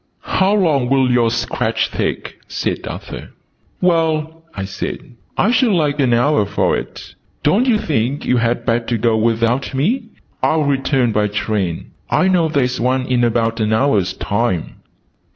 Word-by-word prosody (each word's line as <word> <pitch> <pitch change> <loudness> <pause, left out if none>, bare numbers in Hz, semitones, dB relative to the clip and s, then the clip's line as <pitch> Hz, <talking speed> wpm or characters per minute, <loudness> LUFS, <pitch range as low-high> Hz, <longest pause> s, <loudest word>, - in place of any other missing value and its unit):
"How 195 +2 +4
long 150 -11 +2
will 135 -2 +3
your 120 -2 +3
sketch 120 +1 -1
take?" - - -3
said - - -3
Arthur. - - -7 0.5
"Well," 160 -2 +1
I 95 - -4
said, 95 - -6 0.3
"I 215 - +3
should 245 -2 +3
like 150 -4 +1
an 130 -3 +2
hour 120 -3 +2
for - - +1
it. - - -7 0.3
Don't 205 - +3
you 235 -4 +4
think 140 - -1
you 125 - +2
had 115 0 0
better 115 0 0
go 115 0 +2
without 115 +4 0
me? 220 - 0 0.4
I'll 155 -1 +2
return 135 -3 +1
by 105 -1 +1
train. 100 -4 -2 0.2
I 185 - +2
know 175 -3 +3
there's 130 -5 0
one 130 +1 +1
in 125 -2 +1
about 115 -1 +1
an 110 0 +1
hour's 110 -6 +2
time." 105 -5 -2
125 Hz, 155 wpm, -18 LUFS, 115-155 Hz, 0.5 s, How